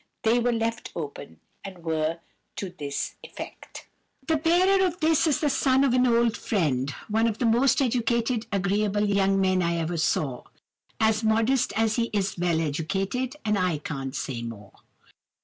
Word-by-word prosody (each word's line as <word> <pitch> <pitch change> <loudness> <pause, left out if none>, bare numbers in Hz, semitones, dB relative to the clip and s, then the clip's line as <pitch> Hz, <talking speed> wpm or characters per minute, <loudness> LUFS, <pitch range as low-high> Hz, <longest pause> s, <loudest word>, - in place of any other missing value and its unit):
They 230 +2 +3
were 245 +1 +1
left 230 -1 -2
open, 140 - -7 0.2
and 185 -3 -9
were 160 0 -1 0.4
to 190 -3 -5
this 145 -5 -4
effect:— - - -10 0.2
"'... 265 - -35
The 320 -1 +2
bearer 365 +5 +3
of 360 -1 -1
this 320 +1 +3
is 300 - +1
the 300 - +2
son 265 0 +3
of 270 -3 +2
an 255 0 +4
old 235 -1 +3
friend. 145 - 0 0.2
One 225 +1 +2
of 220 -2 -2
the 245 - -1
most 240 +4 +3
agreeable 220 -4 0
young 195 -1 +2
men 185 -1 +2
I 170 -1 0
ever 165 +1 -2
saw. 145 -5 -1 0.5
As 220 0 +2
modest 225 +4 +2
as 225 +1 +1
he 235 -1 0
is 200 -1 0
well 170 -2 +1
educated, 195 - -2
and 210 -2 +1
I 180 -4 +1
can't 135 -2 -5
say 130 -3 -4
more. 105 -4 -8
210 Hz, 165 wpm, -26 LUFS, 170-240 Hz, 0.5 s, an